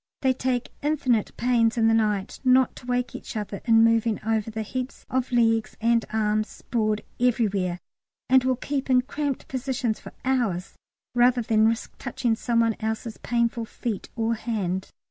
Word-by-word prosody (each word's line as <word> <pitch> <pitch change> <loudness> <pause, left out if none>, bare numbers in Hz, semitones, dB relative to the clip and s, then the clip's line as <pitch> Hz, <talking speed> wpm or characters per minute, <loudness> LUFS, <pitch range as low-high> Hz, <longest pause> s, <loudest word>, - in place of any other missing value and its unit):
They 260 -1 +4
take 255 -1 -2
infinite 270 -7 +1
pains 235 -1 +2
in 225 -1 +4
the 225 - +4
night 210 -3 0
not 255 0 +4
to 245 - -12
wake 245 0 -1
each - - -7
other 205 -1 -4
in 225 -1 +6
moving 230 -1 +3
over 220 -1 0
the 220 0 -4
heaps 255 +4 -5
of 260 0 0
legs 225 -2 +2
and 230 0 +3
arms 215 0 +1
sprawled 215 -3 -1 0.2
everywhere, 205 -7 +1 0.5
and 260 0 +5
will 260 0 +2
keep 275 +2 -3
in 250 -1 +4
cramped 285 0 -3
positions 260 -3 -2
for - - -10
hours 230 -9 0 0.4
rather 245 0 +4
than 220 0 +3
risk 230 +1 -2
touching 240 -3 -1
some 230 0 +1
one 230 -1 +2
else's 220 +1 -3
painful 235 -1 0
feet 220 -2 -5
or 230 0 0
hand. 200 -5 -2
230 Hz, 165 wpm, -25 LUFS, 220-250 Hz, 0.5 s, in